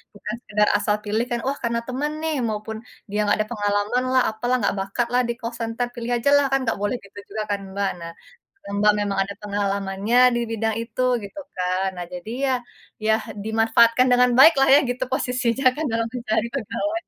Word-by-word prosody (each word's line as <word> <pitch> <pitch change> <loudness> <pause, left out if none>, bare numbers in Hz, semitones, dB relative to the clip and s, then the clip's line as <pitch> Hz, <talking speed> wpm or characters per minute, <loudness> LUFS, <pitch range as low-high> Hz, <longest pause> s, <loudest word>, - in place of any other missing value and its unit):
bukan 210 +1 -6
sekedar 210 -3 +1
asal 210 0 +1
pilih 215 +3 0
kan. 240 -1 -2
Wah, 275 +2 -1
karena 235 0 0
teman 280 +4 -2
nih, 320 -1 0
maupun 215 +1 -5 0.3
dia 210 - -1
enggak 205 - +3
ada 215 - -14
pengalamanlah, 225 +5 +1
apalah, 245 +3 -1
enggak - - +1
bakatlah 235 +6 0
di 235 - -1
call 230 0 -4
center, 230 +2 -2
pilih 240 0 -4
ajalah 280 +4 +4
kan 270 - +3
nggak 225 - -1
boleh 205 +4 -1
gitu 200 0 -17
juga 215 +1 -4
kan, 200 - 0 0.2
Mbak. 200 -1 0
Nah, 170 0 -7 0.7
Mbak, 210 +1 +4
memang 200 -1 -2
ada 200 +1 -7
pengalamannya 200 +1 -1 0.2
di - - +1
bidang 225 -1 -1
itu 230 +2 -5 0.2
gitu 200 +9 -8 0.2
kan. 185 +1 0
Nah 175 - -4
jadi 180 +5 -7
ya 265 - +2 0.5
ya 220 - +4 0.3
dimanfaatkan 225 +3 +4
dengan 250 0 +5
baiklah 270 -1 +7
ya 285 - +8
gitu 250 +1 -1
posisinya 255 0 -1
kan 315 +1 -2
dalam 230 0 0
mencari 235 -2 -1
pegawai. 280 +6 -2
225 Hz, 185 wpm, -23 LUFS, 205-250 Hz, 0.7 s, ya